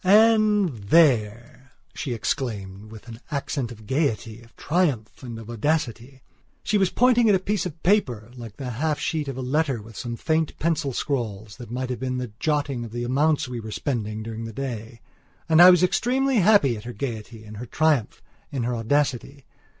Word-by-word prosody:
"And 210 0 +5
there," 120 0 +2 0.2
she 125 -5 -4
exclaimed 105 -4 -4
with 110 +1 -12
an 115 -1 -9
accent 140 -4 -3
of 110 -2 -12
gaiety, 115 -5 -1
of 115 -1 -20
triumph, 145 -10 -1
and 120 -3 -7
of 115 -1 -10
audacity. 125 0 -2 0.4
She 210 - +1
was 190 -2 +3
pointing 240 -1 +4
at 205 - +6
a - - +2
piece 195 0 -1
of 165 -1 -12
paper, 125 - +1
like 115 -4 -10
the 130 -3 -5
half 150 +6 -1
sheet 155 -3 -2
of 135 -2 -5
a 130 - -4
letter 140 -1 0
with 110 +1 -13
some 120 +1 -5
faint 160 +4 -1
pencil 160 -3 0
scrawls 110 -7 -3
that 120 -3 -10
might 125 +2 -3
have 125 - -4
been 130 0 -2
a 125 -2 -4
jotting 145 -5 -1
of 115 - -8
the 120 0 -3
amounts 145 +4 +1
we 125 -1 -5
were 110 -1 -7
spending 110 -3 -3
during 115 0 -6
the 115 - -7
day. 115 -3 -6 0.5
And 160 +1 +6
I 180 - +11
was 180 -1 +5
extremely 255 +7 +2
happy 195 - +4
at 105 - -9
her 120 - -6
gaiety, 110 -2 -6
in 105 0 -11
her 125 - -7
triumph, 150 -4 +1 0.3
in 130 -4 -2
her 120 +1 -1
audacity. 135 +2 -1
130 Hz, 190 wpm, -24 LUFS, 115-160 Hz, 0.5 s, I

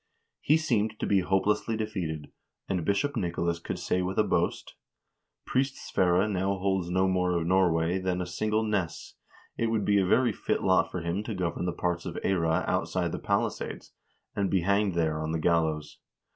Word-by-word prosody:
He 155 - +3
seemed 110 -8 0
to - - -1
be 100 - +3
hopelessly 95 +4 +1
defeated, 90 -9 -4 0.4
and 90 -4 -1
Bishop 100 - 0
Nicolas 85 -4 -1
could - - -5
say 90 - 0
with 95 +1 -3
a - - +5
boast: - - -1 0.7
"Priest 135 +1 0
Sverre 90 +1 +1
now 100 -1 0
holds 95 -2 0
no 95 +1 +2
more 90 -1 +1
of 85 - -1
Norway 90 -1 +2
than 90 -1 -1
a 90 - -2
single 105 +5 0
ness; 100 -7 -2 0.5
it 115 - +2
would 110 -2 0
be 100 -1 +4
a 95 - +2
very 120 +3 +3
fit - - -2
lot 95 -3 +3
for 90 - -4
him 85 +4 -2
to 110 - -4
govern 90 -1 -2
the - - +1
part 85 +1 -2
of 85 - -5
Eyra 80 -4 +1
outside - - 0
the - - -4
palisades, - - -2 0.4
and 100 -2 0
be 95 - +2
hanged 100 +1 +1
there 80 -2 0
on 80 +1 -2
the 80 - 0
gallows. 80 -2 0
95 Hz, 185 wpm, -28 LUFS, 85-100 Hz, 0.7 s, a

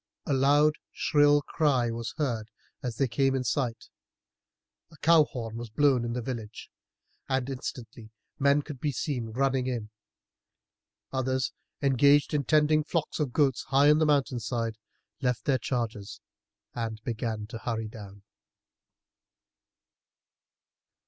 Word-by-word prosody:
A 145 - 0
loud 145 +3 +4 0.2
shrill 145 0 +3
cry 135 -8 +1
was 115 -1 -5
heard 115 -7 -2 0.3
as 125 -3 -4
they 135 +3 +1
came 135 +2 +1
in 130 - -1
sight, 120 -2 -2 1.0
a 160 - -16
cow 160 0 +5
horn 115 -5 -6
was 120 -1 -6
blown 135 +1 +3
in 120 0 -3
the 125 0 -3
village, 115 -4 -6 0.6
and 130 -1 0
instantly 125 -4 -7 0.3
men 140 +1 +3
could 145 -4 -8
be 145 +3 -1
seen 125 -3 -3
running 130 +2 0
in. 115 -4 -3 1.2
Others, 130 0 -1 0.3
engaged 140 +2 +4
in 145 -2 0
tending 155 +2 +3
flocks 160 +1 -2
of 145 -5 0
goats 135 -2 +2
high 140 +2 +4
up - - +8
on 150 - +5
the 155 - +3
mountain 140 -4 +2
side, 115 -1 -3 0.4
left 125 -2 -1
their 135 -3 +2
charges 115 -5 -3 0.5
and 115 -2 -4
began 110 -2 -3
to 115 +1 -8
hurry 110 -2 -3
down. 100 -3 -11
130 Hz, 135 wpm, -28 LUFS, 115-145 Hz, 1.2 s, up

